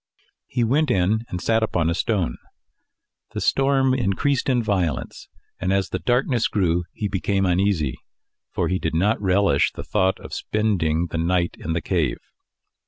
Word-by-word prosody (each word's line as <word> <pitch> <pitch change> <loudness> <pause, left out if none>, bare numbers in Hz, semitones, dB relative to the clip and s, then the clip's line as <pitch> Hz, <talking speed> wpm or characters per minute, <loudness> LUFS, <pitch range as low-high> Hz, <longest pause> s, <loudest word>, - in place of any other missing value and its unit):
He 120 - 0
went 145 +6 +2
in, 105 +2 +1
and 90 - -4
sat 115 +4 +1
upon 90 -7 0
a 85 - +1
stone. 95 - -1 1.0
The - - -1
storm 135 -1 +2
increased 130 +4 0
in 125 -2 +2
violence, 90 - -2 0.3
and 95 +2 -1
as 95 0 +1
the - - -2
darkness 125 -1 +1
grew 90 -4 0
he 105 - -3
became 95 0 0
uneasy, 90 -7 +1 0.5
for - - -1
he 95 0 0
did 80 - -2
not 100 +6 +2
relish 95 -6 +3
the - - -8
thought 95 0 +1
of - - -10
spending 85 -7 0
the 85 - -2
night 85 +1 0
in 80 - -3
the 85 - -1
cave. 80 -6 0
95 Hz, 165 wpm, -23 LUFS, 85-110 Hz, 1.0 s, relish